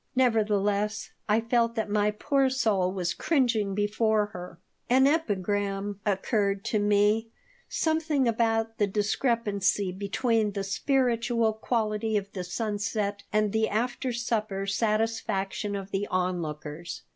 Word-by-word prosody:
Nevertheless, 210 -4 +1 0.2
I 210 +2 +4
felt 230 0 +1
that 220 -2 -1
my 210 0 +2
poor 270 +5 +1
soul 210 -8 +1
was 180 -2 -1
cringing 235 - +1
before 210 +1 +2
her 180 -1 -8 0.3
An 260 +2 +5
epigram 205 - 0
occurred 200 0 0
to 215 - +1
me, 210 +2 +2 0.4
something 315 -4 +1
about 225 -1 0
the 205 - +3
discrepancy 205 -2 0
between 210 +3 0
the 200 -1 -2
spiritual 230 +1 +1
quality 220 -1 -1
of 200 -1 -4
the 185 - -4
sunset 205 +2 -2
and 215 -1 +2
the 220 0 +2
after 245 +4 -1
supper 215 -4 -2
satisfaction 210 -1 -1
of 195 0 -6
the 200 +1 -1
onlookers. 170 -3 -3
210 Hz, 120 wpm, -27 LUFS, 200-230 Hz, 0.4 s, An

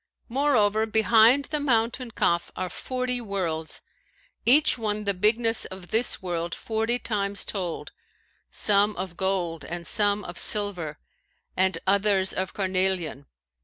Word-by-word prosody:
Moreover, 225 -5 +2
behind 225 +5 +4
the 300 0 -3
mountain 245 -2 0
Kaf 170 -5 0
are 185 -1 -3
forty 255 +2 -3
worlds, 175 -7 -3 0.6
each 295 +6 +6
one 215 -2 -3
the 200 -1 0
bigness 225 +4 +1
of 190 -1 -10
this 225 -2 +1
world 170 -2 -3
forty 225 +2 -1
times 200 -4 0
told, 180 -5 -4 0.6
some 205 0 +3
of 185 -1 -6
gold 180 -3 -1
and 175 0 -6
some 205 +1 +1
of 175 -1 -8
silver 180 -8 0 0.6
and 190 +1 +1
others 195 -1 +2
of 185 0 -3
carnelian. 185 -6 -1
205 Hz, 130 wpm, -25 LUFS, 185-225 Hz, 0.6 s, each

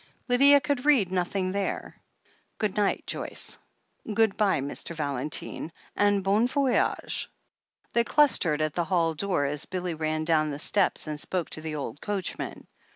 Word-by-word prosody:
Lydia 280 +3 +6
could 280 -2 -1
read 260 -11 +4
nothing 185 +1 -1
there. 200 0 -3 0.6
"Good 210 -3 -1
night, 205 -2 +1
Joyce - - -4 0.3
— - - -27
^good 220 -3 +3
bye, 200 -7 +2
Mr. 140 +4 -4
Valentine 145 +2 -3
— - - -30
^and 205 -1 +2
bon 205 +5 +3
voyage.^ 270 -1 +1 0.7
They 235 - +3
clustered 215 - +3
at 155 -1 -1
the 175 0 -1
hall 165 -2 +1
door 175 -3 0
as 145 0 -3
Billy 180 -1 -3
ran 155 0 -2
down 155 -2 +3
the 140 - -4
steps 190 +5 +1
and 150 -1 -5
spoke 180 +2 -3
to 155 - -3
the 155 -1 -4
old 140 -2 -5
coachman. 200 -3 -4
185 Hz, 160 wpm, -27 LUFS, 155-210 Hz, 0.7 s, Lydia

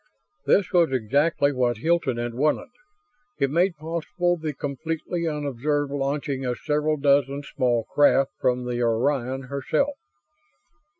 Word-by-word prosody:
This 195 -2 +3
was 170 -5 +4
exactly 140 +5 +2
what 125 -3 +1
Hilton 160 -1 +1
had 120 0 -3
wanted. 150 - 0 0.7
It 135 -1 +1
made 175 +2 +2
possible 170 +3 -1
the 160 -2 -4
completely 160 +5 -3
unobserved 145 -1 -1
launching 140 -1 -2
of 125 -1 -2
several 150 0 0
dozen 140 0 +2
small 125 -5 0
craft 135 0 +3
from 125 0 0
the 120 0 -2
Orion 130 +3 0
herself. 140 - -1
140 Hz, 125 wpm, -24 LUFS, 130-155 Hz, 0.7 s, was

